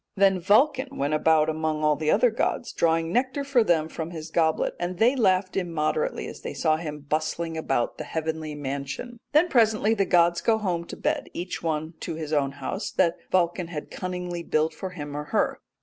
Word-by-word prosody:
Then 195 -1 +4
Vulcan 255 - +2
went 140 +2 0
about 155 0 +4
among 155 -1 -1
all 150 0 +4 0.2
other 235 +3 +4
gods 235 +1 -1
drawing 165 0 +1
nectar 260 +3 0
for 275 -4 +3
them 165 -6 +2
from 160 0 -5
his 160 -2 -8
goblet, 160 -1 +1
and 175 +1 -3
they 240 +7 +4
laughed 185 -6 +2
immoderately 175 - -1
as - - -9
they - - -6
saw 155 -2 +2
him 150 -2 -6
bustling 155 +3 -2
about 135 -6 -1
the - - -3
heavenly 160 -1 -3
mansion." 140 - -5
Then 305 +4 +5
presently 220 -6 +3
the 200 -3 +1
gods 170 -1 +3
go 225 -1 +3
home 180 -5 -2
to - - -8
bed, - - -1
each 180 +1 -4
one 160 0 -2
in 160 - -4
his 155 -1 -4
own 140 -2 +1
house 145 +9 -4
that 170 -3 +2
Vulcan 175 -1 +1
had 155 -3 -7
cunningly 180 -1 -4
built 160 -1 0
for 185 +4 -5
him 145 -5 -7
or 150 0 -4
her. - - 0
170 Hz, 195 wpm, -26 LUFS, 155-195 Hz, 0.2 s, Then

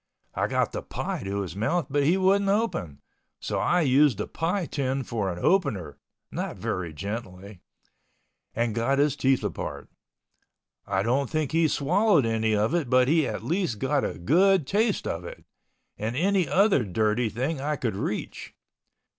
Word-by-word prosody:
I - - 0
got - - 0
the - - -4
pie - - -4
to 100 +1 -2
his 95 -2 -6
mouth 145 - 0
but 145 +1 0
he 160 +7 +3
wouldn't 195 +1 +3
open, 195 - -1 0.4
so - - -2
I 175 0 +2
used 140 -4 +4
the 105 - -2
pie 175 +3 -2
tin 135 -2 -2
for 110 -6 -2
an 85 - -6
opener 100 - 0 0.3
(not - - -4
very 90 -3 -3
gently) 100 +1 -7 0.9
and 115 -1 0
got 115 +5 +1
his 145 0 +2
teeth 135 -2 +1
apart. - - -5 1.0
I 95 -1 0
don't 130 +4 0
think 155 -3 -1
he 165 0 +3
swallowed 170 - +2
any 110 -1 +1
of 105 +7 +1
it 165 -7 0
but 125 0 +4
he 155 -1 +3
at - - -4
least 170 - -1
got 135 +4 0
a - - -3
good 175 - +3
taste 210 - 0
of 85 +1 -3
it—and 110 +5 -9
any 185 0 +1
other 195 - +4
dirty 110 +4 0
thing 135 +7 -3
I 150 +2 -1
could 115 -7 -2
reach. - - -5
135 Hz, 165 wpm, -26 LUFS, 105-165 Hz, 1.0 s, used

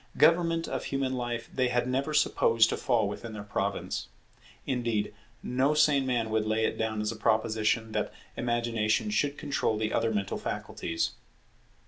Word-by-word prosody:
Government 165 -1 +4
of - - -3
human 135 -1 -1
life 120 -2 -3
they 130 -1 +2
had 125 0 +1
never 135 +4 0
supposed 115 -6 +4
to - - 0
fall 115 -5 +2
within 110 +2 -6
their 105 -1 -6
province. 100 -1 -2 0.6
Indeed 120 -5 -1 0.3
no 135 +4 +1
sane 140 -3 +4
man 115 -3 0
would 110 -1 +1
lay 110 +1 +2
it - - 0
down 110 -1 -1
as 105 +1 -1
a - - -6
proposition 110 0 +1
that - - -1 0.2
Imagination 120 - 0
should 145 -8 +1
control 140 -7 0
the 110 0 -1
other 115 - +1
mental 100 -3 -2
faculties. 80 0 -2
115 Hz, 160 wpm, -29 LUFS, 110-130 Hz, 0.6 s, Government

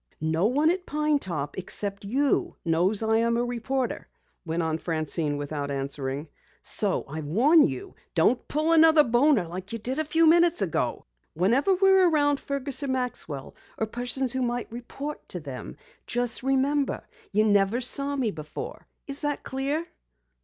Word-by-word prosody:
"No 160 +5 +1
one 295 +7 +3
at 365 0 -4
Pine 300 0 +1
Top 150 - -4
except 200 +2 -5
you 270 +7 0
knows 180 +6 +1
I 220 0 +2
am 235 +1 +1
a 240 - 0
reporter," 245 +2 -3 0.4
went 165 0 -2
on 160 0 -1
Francine 155 -2 -1
without 145 0 -4
answering. 140 +1 -3 0.4
"So 200 -3 +1
I 155 +3 -5
warn 245 - +4
you, 130 -3 -6 0.2
don't 215 +9 +2
pull 310 +2 0
another 320 -1 +7
boner 240 - +3
like 185 +5 -7
you - - -2
did 255 +6 -3
a - - +1
few 320 +2 +2
minutes 340 - +4
ago. 160 -8 -2 0.3
Whenever 245 - +3
we're 385 -1 +5
around 290 -3 +2
Fergus 280 0 -1
or 280 - -2
Maxwell 250 - -3 0.2
or 220 - 0
persons 245 +3 0
who 260 - -1
might 240 -2 -2
report 275 +5 -7
to 180 - -1
them, 140 -5 -8 0.3
just 245 -1 +2
remember 270 +2 0 0.2
you 215 +2 +3
never 205 +2 +3
saw 275 +3 +1
me 250 -6 0
before. 155 -3 -8 0.2
Is 280 0 -2
that 290 -1 -2
clear?" 280 +5 -2
240 Hz, 160 wpm, -26 LUFS, 170-285 Hz, 0.4 s, another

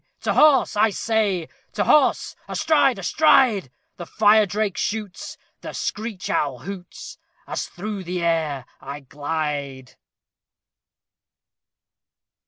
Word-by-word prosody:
To - - 0
horse! 280 -7 +4
I 215 +2 +4
say, 205 -5 -1 0.3
To - - 0
horse! 300 -3 +3
astride! 270 -6 +2
astride! 235 - +3 0.3
The 175 - -8
fire 215 0 +4
drake 205 0 -1
shoots 210 -3 -4 0.2
The - - -7
screech 215 -3 -4
owl 140 -4 -1
hoots 180 +7 -9 0.3
As - - -4
through 200 0 -6
the 180 0 -3
air 155 -6 0
I 145 +1 -8
glide! 145 -2 -4
195 Hz, 105 wpm, -22 LUFS, 155-220 Hz, 0.3 s, horse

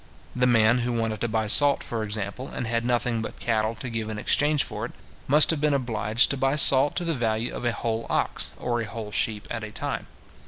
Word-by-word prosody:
The 125 0 +2
man 115 0 +3
who 120 0 -2
wanted 115 -2 -3
to 120 - 0
buy 110 -1 -1
salt, 140 +6 +5
for 115 -2 -4
example, 105 +4 -5
and - - -5
had 115 0 -1
nothing 120 -1 -1
but 110 - -8
cattle 110 -1 -1
to 115 +3 -8
give 115 -2 -4
in 110 - -5
exchange 145 +6 +1
for - - -7
it, - - -16 0.3
must 150 +4 +7
have 155 -3 -3
been 150 -2 +1
obliged 115 -3 +1
to 140 - -2
buy 135 +2 0
salt 140 -1 +5
to 175 - -2
the 165 - 0
value 115 -2 -2
of - - -6
a 120 - +1
whole 115 -1 -4
ox, - - -1
or 120 -1 -2
a - - -4
whole 110 0 -8
sheep, 105 0 -1
at 115 -2 -4
a 110 - -6
time. 105 - -5
115 Hz, 235 wpm, -24 LUFS, 110-130 Hz, 0.3 s, must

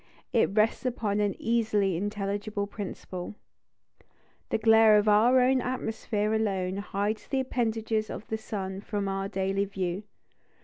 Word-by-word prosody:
It 230 - +4
rests 215 +1 +3
upon 220 -5 -1
an 205 -2 +1
easily 215 -5 +1
intelligible 205 +2 -2
principle. 195 -2 -7 1.1
The - - +1
glare 220 -1 +6
of 210 +1 +2
our 225 +5 +5
own 255 +1 +3
atmosphere 220 -4 -2
alone 195 -4 0
hides 205 +1 -2
the 270 - 0
appendages 225 -3 -1
of - - -6
the 220 - -3
sun 195 -3 -5
from 205 -1 -3
our 195 0 -2
daily 195 +1 -1
view. 190 -1 -3
210 Hz, 135 wpm, -28 LUFS, 195-225 Hz, 1.1 s, glare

